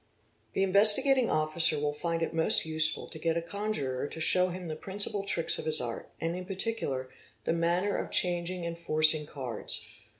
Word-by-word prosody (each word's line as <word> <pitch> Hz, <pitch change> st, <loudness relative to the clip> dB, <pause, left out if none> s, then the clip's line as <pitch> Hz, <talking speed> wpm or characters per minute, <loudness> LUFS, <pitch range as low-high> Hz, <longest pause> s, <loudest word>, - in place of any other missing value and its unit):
The 195 Hz, -, 0 dB
Investigating 220 Hz, +7 st, +6 dB
Officer 155 Hz, 0 st, +1 dB
will 145 Hz, 0 st, -2 dB
find 165 Hz, +2 st, -3 dB
it -, -, -4 dB
most 160 Hz, 0 st, +4 dB
useful 155 Hz, 0 st, -1 dB
to 155 Hz, -, -10 dB
get 165 Hz, +1 st, -1 dB
a -, -, +1 dB
conjuror 170 Hz, -9 st, -4 dB
to 160 Hz, -, -9 dB
show 180 Hz, +3 st, +2 dB
him 180 Hz, 0 st, -7 dB
the 155 Hz, -, -5 dB
principal 200 Hz, +4 st, -2 dB
tricks 195 Hz, -4 st, -1 dB
of -, -, -7 dB
his 155 Hz, -1 st, +5 dB
art, 120 Hz, -2 st, -6 dB
and, 165 Hz, +1 st, -3 dB
in 185 Hz, 0 st, -7 dB
particular, 190 Hz, -, -3 dB, 0.4 s
the -, -, -1 dB
manner 175 Hz, +4 st, -1 dB
of -, -, -5 dB
changing 175 Hz, 0 st, -2 dB
and 170 Hz, 0 st, -5 dB
forcing 155 Hz, -2 st, +3 dB
cards. 130 Hz, -7 st, -3 dB
170 Hz, 180 wpm, -28 LUFS, 155-190 Hz, 0.4 s, Investigating